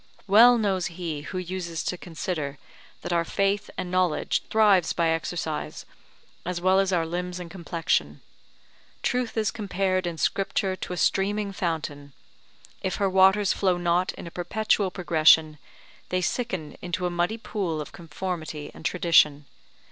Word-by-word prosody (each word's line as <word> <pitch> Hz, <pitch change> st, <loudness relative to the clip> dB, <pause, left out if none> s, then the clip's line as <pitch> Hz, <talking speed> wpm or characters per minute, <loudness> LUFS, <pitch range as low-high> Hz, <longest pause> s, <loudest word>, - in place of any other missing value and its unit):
Well 235 Hz, +5 st, +7 dB
knows 190 Hz, -6 st, 0 dB
he 165 Hz, -4 st, -5 dB
who 185 Hz, +5 st, -6 dB
uses 180 Hz, -2 st, -4 dB
to -, -, -2 dB
consider, 160 Hz, -5 st, -4 dB, 0.5 s
that -, -, -2 dB
our 170 Hz, -1 st, +2 dB
faith 195 Hz, +4 st, 0 dB
and 180 Hz, -1 st, -4 dB
knowledge 185 Hz, -3 st, +1 dB
thrives 205 Hz, -6 st, +4 dB
by 170 Hz, -1 st, +1 dB
exercise, 160 Hz, -1 st, -3 dB, 0.6 s
as 180 Hz, 0 st, -3 dB
well 185 Hz, +2 st, +3 dB
as 195 Hz, -1 st, +1 dB
our 170 Hz, -3 st, +1 dB
limbs 180 Hz, +2 st, -4 dB
and 170 Hz, -2 st, -8 dB
complexion. 165 Hz, -, -1 dB, 0.8 s
Truth 245 Hz, -2 st, -1 dB
is 215 Hz, -2 st, +1 dB
compared 190 Hz, -3 st, -1 dB
in 170 Hz, -1 st, -4 dB
Scripture 195 Hz, +1 st, 0 dB
to 180 Hz, -, -6 dB
a -, -, -5 dB
streaming 200 Hz, +3 st, +1 dB
fountain; 150 Hz, -6 st, -3 dB, 0.7 s
if 190 Hz, -, -2 dB
her 195 Hz, -2 st, 0 dB
waters 190 Hz, +2 st, +5 dB
flow 185 Hz, -3 st, +1 dB
not 175 Hz, +1 st, +1 dB
in -, -, -9 dB
a 170 Hz, -, -8 dB
perpetual 200 Hz, +2 st, 0 dB
progression, 160 Hz, -4 st, +4 dB, 0.5 s
they 185 Hz, -, +1 dB
sicken 180 Hz, -, -3 dB
into 180 Hz, 0 st, -3 dB
a 180 Hz, -, 0 dB
muddy 175 Hz, +6 st, 0 dB
pool 190 Hz, -8 st, -3 dB
of 150 Hz, -, -6 dB
conformity 160 Hz, -2 st, -5 dB
and -, -, -13 dB
tradition. 165 Hz, -4 st, +3 dB
180 Hz, 150 wpm, -26 LUFS, 165-195 Hz, 0.8 s, Well